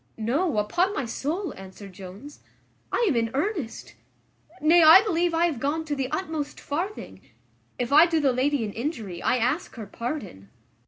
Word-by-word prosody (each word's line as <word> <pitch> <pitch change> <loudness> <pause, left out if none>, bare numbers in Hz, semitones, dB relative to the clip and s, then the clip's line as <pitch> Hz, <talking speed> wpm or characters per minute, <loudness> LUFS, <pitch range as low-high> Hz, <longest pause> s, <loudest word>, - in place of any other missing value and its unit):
"No, 265 +6 0
upon 355 - +1
my 270 - -2
soul," 315 - -3
answered 190 +1 -11
Jones, 195 +10 -11 0.5
"I 485 - +1
am 295 - +2
in 230 -1 +1
earnest: 310 - -3 0.7
nay, 330 +3 +5
I 325 +5 +9
believe 350 -4 +1
I 335 +1 +3
have 315 -8 -1
gone 300 +5 -1
to 295 -2 -2
the 265 -2 -2
utmost 315 -5 -4
farthing. 355 +9 -5 0.6
If 245 +2 -2
I 320 +4 +8
do 330 -1 +1
the 275 -4 +2
lady 265 -1 +1
an 205 - -6
injury, 225 - -5
I 255 - +2
ask 255 +9 -1
her 225 -3 -7
pardon." 215 - -6
285 Hz, 170 wpm, -25 LUFS, 230-330 Hz, 0.7 s, I